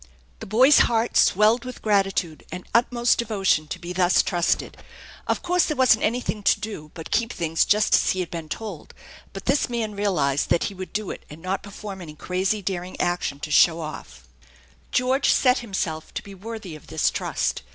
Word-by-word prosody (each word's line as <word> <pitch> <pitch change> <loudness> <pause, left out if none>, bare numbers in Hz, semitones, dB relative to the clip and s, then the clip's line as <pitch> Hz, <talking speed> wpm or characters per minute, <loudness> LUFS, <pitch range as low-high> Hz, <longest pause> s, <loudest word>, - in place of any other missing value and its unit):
The - - -8
boy's 255 +8 +6
heart 230 0 0
swelled 215 +5 +4
with 255 -1 -9
gratitude 195 -6 0
and 180 +2 -7
utmost 240 +1 +2
devotion 195 -9 +1
to 170 - -5
be 175 0 -7
thus 180 0 +3
trusted* 175 -2 0 0.5
Of - - -1
course 360 0 +2
there 305 - -2
wasn't 255 -4 +4
anything 225 -1 -1
to 205 - +3
do 205 -8 -7
but 165 -2 -9
keep 235 +1 +1
things 165 -1 0
just 210 +1 +2
a/) - - +5
he 185 - 0
had 180 - -3
been 165 -2 -6
told, 205 -7 -7 0.4
but 195 - -9
this 275 0 +2
man 230 -3 -2
realized 165 -9 0
that 170 - +2
he - - -3
would 185 -1 -8
do 210 -1 -3
it - - -9
and 150 - -11
not 185 +3 -3
perform 200 -1 -8
any 155 -3 -9
crazy, 190 +6 -1
daring 185 -1 -4
action 175 -5 -1
to 155 - -5
show 165 +2 +5
off. 110 - -8 0.6
Georgo 260 +2 +2
set 255 -1 +4
himself 185 -8 -4
to - - -4
be 200 - -11
worthy 205 -3 -8
of 155 - -14
this 160 -1 +1
trust. - - -2
195 Hz, 195 wpm, -24 LUFS, 170-225 Hz, 0.6 s, boy's